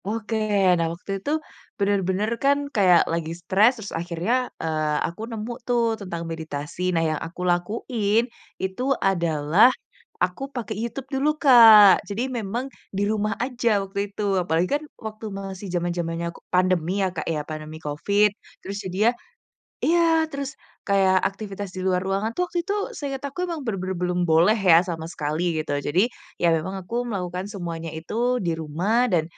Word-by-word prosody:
Oke, 220 +1 -3 0.5
nah 165 - +1
waktu 180 +3 -8
itu 285 - -3 0.5
bener-bener 200 0 +1
kan 280 +1 +4 0.2
kayak 185 -5 +6
lagi 165 -1 -2
stress 200 +7 +4
terus 210 -3 -7
akhirnya, 175 +5 -2 0.3
eee, 155 -2 0
aku 170 +5 -8
nemu 225 +1 -4
tuh 240 -1 +2 0.2
tentang 170 -4 -5
meditasi. 160 0 -6
Nah 165 -1 +2
yang 155 -1 -1
aku 180 +2 -10
lakuin 210 +4 0 0.4
itu 190 +5 -3 0.3
adalah 170 +3 +4 0.5
aku 180 +6 -1
pakai 225 -3 -3
YouTube 235 +3 -4
dulu 270 +3 +2
Kak, 225 -7 +9
jadi 205 +3 -2 0.2
memang 230 +4 -3 0.3
di 200 - +1
rumah 215 -1 0
aja 250 -2 -1 0.2
waktu 195 +1 -5
itu. 200 - -7 0.2
Apalagi 175 +1 0
kan 295 +1 0 0.2
waktu 220 0 -6
masih 195 0 -6
zaman-zamannya 170 -1 -2
ko - - -14
pandemi 180 -2 +2
ya, - - +2
Kak, 165 - -4
ya, 150 - -1
pandemi 155 0 -6
covid 200 +8 +2 0.4
terus 200 +1 -4
jadinya 195 +5 +2 0.7
iya, 340 +2 +4 0.3
terus 280 -2 -4 0.4
kayak 195 -2 +4
aktivitas 200 -1 -7
di - - -5
luar 180 -1 +2
ruangan 195 +3 -1
tuh 360 - +2
waktu 355 -1 -3
itu 400 - 0 0.2
seingat 275 -2 -4
aku 280 +5 -9
emang 335 -2 -3
bener-bener 190 -4 -3
belum 180 0 0
boleh 165 +6 +5 0.2
ya 165 - +9
sama 160 -2 -4
sekali 150 +2 -2 0.2
gitu. 155 - -3 0.2
Jadi, 165 +6 +3 0.4
ya 175 - +4
memang 185 +5 -4
aku 230 - -5
melakukan 180 -3 -3
semuanya 165 -4 -5
itu 160 +5 -8 0.3
di 170 - +1
rumah 165 +8 -2 0.2
dan 165 -3 +3
190 Hz, 160 wpm, -24 LUFS, 170-220 Hz, 0.7 s, Kak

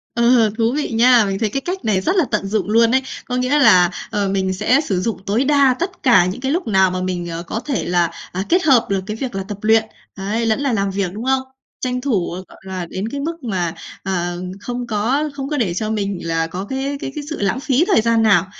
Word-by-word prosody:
Ờ, 235 -2 +4
thú 230 +1 +2
vị 300 - -2
nha! 235 0 +5
Mình 195 0 -2
thấy 220 -1 0
cái 275 - -2
cách 360 +4 -5
này 210 -4 +2
rất 365 - 0
là 355 - +4
tận 210 -2 -1
dụng 205 0 -1
luôn 230 +2 +4
ấy. 265 - +3 0.2
Có 250 - -3
nghĩa 255 +4 +2
là, 180 -11 +6 0.2
ờ, 205 -1 0
mình 190 -1 0
sẽ 250 +8 +2
sử 195 - -1
dụng 225 +3 -2
tối 220 +7 +1
đa 280 -2 +4
tất 375 +3 -4
cả 240 - +5
những 185 +7 -4
cái 265 +1 -1
lúc 345 +2 -1
nào 190 -3 +3
mà 185 0 -3
mình, 180 -2 -3
ờ, 165 0 -5
có 215 +6 -4
thể 265 -2 -2
là, 175 -1 +1 0.2
à, 185 +2 -2
kết 360 +2 +3
hợp 260 -7 +4
được 195 -1 +1
cái 215 +1 -4
việc 245 -1 -4
là 195 - -2
tập 205 -2 -5
luyện, 220 +1 +4 0.3
ấy, 210 +4 -2
lẫn 220 +3 +1
là 280 -3 0
làm 200 -3 0
việc, 190 -2 -2
đúng 220 +4 -6
không? 265 0 +2 0.4
Tranh 250 -1 -2
thủ, 235 -10 0 0.2
gọi - - -16
là, 185 -2 -4
đến 190 +5 -4
cái 280 +4 -5
mức 330 +3 -4
mà, 180 -7 -2 0.3
ờ, 175 -2 -2 0.2
không 245 +2 -4
có 245 +8 0
không 275 -1 -5
có 300 - -2
để 210 -10 0
cho 215 +4 -2
mình 200 -3 -2
là 165 0 0
có 180 +4 -5
cái 270 +5 -3
cái 270 - -5
cái 300 - -5
sự 315 - -5
lãng 205 +5 0
phí 275 +3 +2
thời 390 - +4
gian 230 0 +2
nào. 200 -5 +4
225 Hz, 260 wpm, -19 LUFS, 190-265 Hz, 0.4 s, là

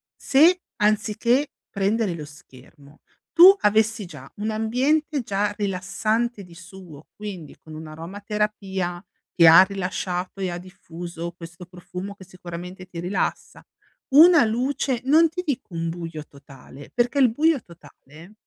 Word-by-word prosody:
se 335 +7 +4 0.2
anziché 215 +5 +1 0.2
prendere 200 0 0
lo 155 -3 -7
schermo 145 0 -17 0.3
tu 370 +3 +9
avessi 215 0 +2
già 150 -6 -12
un 210 +2 -3
ambiente 265 +8 0
già 205 -2 -1
rilassante 205 +3 -2
di 175 -2 -15
suo, 175 -4 -13
quindi 190 -8 -8
con 155 - -14
un'aromaterapia 190 +3 -4 0.3
che 170 -2 +6
ha 165 +2 +10
rilasciato 185 -1 -4
e 185 - -1
ha 175 - -4
diffuso 170 -1 -8
questo 175 +1 -12
profumo, 180 +2 -9
che 190 - -14
sicuramente 180 0 -9
ti 180 -2 -9
rilassa, 180 +4 -3 0.4
una 320 +2 +7
luce 250 +3 -1
non 320 +4 +5
ti 360 +3 -5
dico 255 - -4
un 165 0 -3
buio 165 -2 -7
totale, 140 0 -15
perché 245 +3 0
il 255 -4 +5
buio 300 +2 +2
totale 170 +1 -16
195 Hz, 135 wpm, -23 LUFS, 170-225 Hz, 0.4 s, ha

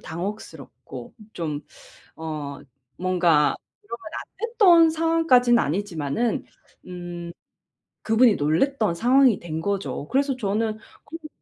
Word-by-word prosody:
당혹스럽고 195 +6 -8 0.2
좀 150 -4 -5 0.5
어 150 -3 -6 0.4
뭔가 175 -5 +2 0.2
그러면 230 +3 -8
안 460 +4 -6
됐던 345 -8 +6
상황까지는 320 -7 +3
아니지마는 185 +3 -1 0.4
음 175 -1 -7 0.7
그분이 225 0 +4
놀랬던 205 - +1
상황이 250 +3 +4
된 160 -2 -5
거죠. 195 -5 -3
그래서 275 +1 +1
저는 215 -1 -1 0.3
그런 330 - -9
거 310 - -9
205 Hz, 240 characters per minute, -24 LUFS, 170-255 Hz, 0.7 s, 됐던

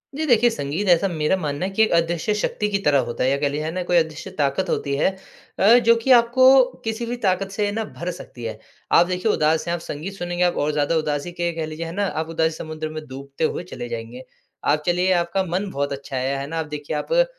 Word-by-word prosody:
जी, 310 +2 -1
देखिए, 240 -4 +4
संगीत 175 -1 -3
ऐसा 175 +3 +4
मेरा 160 0 0
मानना 150 0 -2
है 195 - -3
कि 220 +3 +3
एक 220 - +1
अदृश्य 170 +4 +1
शक्ति 210 0 -1
की 200 - +1
तरह 145 -4 +3
होता 120 - -2
है, 130 - +3
या 140 - +2
कह 145 0 0
लीजिए, 150 +2 -3
है 160 - -2
ना, 180 +1 -3
कोई 175 0 +2
अदृश्य 160 +2 -1
ताकत 145 +6 0
होती 140 -3 -1
है 145 - +2 0.5
अ, 195 - +4
जो 230 -1 +5
कि 230 +3 0
आपको 255 +2 +7 0.2
किसी 225 +1 -3
भी 240 +1 -3
ताकत 195 +1 +1
से 205 0 -1
ना, 225 +2 -2
भर 180 -4 -6
सकती 150 -8 -11
है। 110 -1 -4 0.3
आप 170 - +6
देखिए, 185 +4 0
उदास 155 +2 +1
हैं 170 - 0
आप - - -5
संगीत 165 +7 -6
सुनेंगे, 175 -1 -2
आप 175 -1 +2
और 150 +1 +1
ज़्यादा 150 +2 0
उदासी 150 +2 -2
के 175 0 -2
कह 165 -1 -2
लीजिए, 155 +1 -6
है 165 - -6
ना? 200 +2 0
आप 160 -3 -3
उदासी 160 0 +1
समुद्र 155 -1 -5
में 155 0 -7
डूबते 140 +2 -7
हुए 165 - 0
चले 120 - -5
जाएँगे। 115 +2 -6 0.4
आप 150 +1 +2
चलिए, 180 +1 +2
आपका 175 +2 0
मन 190 +3 -2
बहुत 140 -2 -2
अच्छा 135 0 -7
है, 135 +2 -1
है 140 - -5
ना? 165 +2 -3
आप 160 - -2
देखिए, 150 +1 -5
आप - - -4
क - - +5
170 Hz, 255 wpm, -22 LUFS, 150-195 Hz, 0.5 s, आपको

